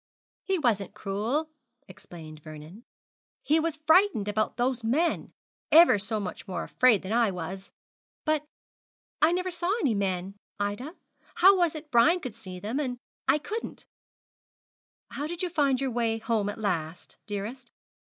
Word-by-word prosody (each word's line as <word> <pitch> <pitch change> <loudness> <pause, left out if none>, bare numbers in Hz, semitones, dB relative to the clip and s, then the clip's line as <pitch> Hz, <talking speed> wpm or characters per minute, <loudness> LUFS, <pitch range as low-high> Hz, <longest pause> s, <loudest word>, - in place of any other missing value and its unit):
'He 385 -1 +1
wasn't 225 - 0
cruel,' 235 +11 -2 0.4
explained 160 -4 -11
Vernon; 155 +7 -11 0.6
'he 315 +2 +3
was 325 -1 -1
frightened 315 - +3
about 215 +1 -1
those 245 0 0
men, 300 +10 0 0.4
ever 325 -10 +8
so 215 +2 -2
much 195 -3 -6
more 190 - -3
afraid 250 -6 +3
than 190 +3 -3
I 235 -2 +3
was. 190 +2 -6 0.5
But 310 -1 +1 0.8
I 310 - +6
never 365 +1 -1
saw 350 +1 -1
any 275 - +2
men, 195 -1 -2 0.2
Ida. 205 - -3 0.4
How 390 +2 +7
was 345 -4 +2
it 310 0 -9
Brian 305 +10 +5
could 255 -9 -6
see 185 -5 -9
them, 215 +7 -3
when 255 -4 -2 0.3
I 265 +3 +5
couldn't?' 430 +9 -6 1.3
'How 290 +2 -4
did 345 +2 -5
you 360 - -1
find 280 -4 +2
your 270 -1 -1
way 230 -1 0
home 225 -2 0
at 205 - -5
last, 175 -6 -3
dearest?' 220 +5 -5
235 Hz, 155 wpm, -28 LUFS, 200-310 Hz, 1.3 s, ever